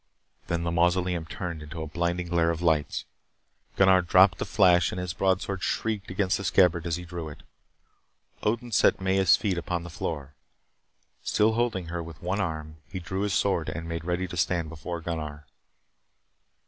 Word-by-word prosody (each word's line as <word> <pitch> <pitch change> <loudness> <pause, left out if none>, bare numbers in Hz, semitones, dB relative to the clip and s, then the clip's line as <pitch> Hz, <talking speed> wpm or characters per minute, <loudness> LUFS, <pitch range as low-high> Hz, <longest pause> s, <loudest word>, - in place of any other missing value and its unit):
Then 85 0 -1
the 85 - -1
mausoleum 90 0 +1
turned 85 -2 -5
into 80 +2 -6
a - - -5
blinding 85 +3 -1
glare 85 -1 +2
of 85 +1 -2
lights. 80 -3 +1 0.7
Gunnar 95 -1 +5
dropped 90 0 +5
the - - -1
flash 90 -1 +4
and 90 - -4
his 90 -1 -3
broadsword 95 0 0
shrieked 110 -4 -2
against 95 0 +1
the - - -5
scabbard 90 -2 +3
as 85 - 0
he 90 0 -7
drew 85 -2 -6
it. 75 - -12 1.0
Odin 115 +3 -1
set 100 - +4
Maya's 95 -1 +4
feet 95 -5 -1
upon 85 0 -3
the 85 - -8
floor. 75 -4 -4 0.9
Still 110 +1 +2
holding 110 -7 -1
her 85 0 -3
with 80 -2 -9
one 100 - -2
arm, 80 -4 -4
he 95 - -4
drew 95 +2 -4
his 100 -2 0
sword 95 -5 +1
and 85 +1 -5
made 85 -1 -4
ready 90 +2 -1
to 90 - -7
stand 85 -1 0
beside 85 +2 -6
Gunnar. 75 -3 -5
85 Hz, 175 wpm, -27 LUFS, 85-95 Hz, 1.0 s, Gunnar